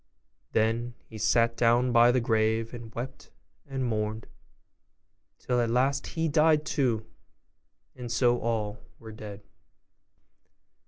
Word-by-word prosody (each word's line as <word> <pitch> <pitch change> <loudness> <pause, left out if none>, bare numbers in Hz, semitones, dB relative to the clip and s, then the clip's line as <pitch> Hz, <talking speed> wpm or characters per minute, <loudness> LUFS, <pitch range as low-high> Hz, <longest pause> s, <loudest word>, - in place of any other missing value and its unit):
Then 115 +2 0
he 110 - -10
sat 115 +2 +2
down 120 +2 +3
by 120 0 +6
the 130 - +2
grave, 110 0 +1
and 120 -2 -9
wept 130 +3 -7 0.4
and 135 -2 -3
mourned, 110 -1 -2 1.1
till 125 -1 0
at 115 - 0
last 135 +4 +1
he 165 0 -1
died 155 0 +3
too; 120 -8 0 0.9
and 125 -2 -7
so 120 0 +3
all 110 -2 -2 0.2
were 110 -1 -11
dead. 105 -2 -9
120 Hz, 120 wpm, -28 LUFS, 110-125 Hz, 1.1 s, by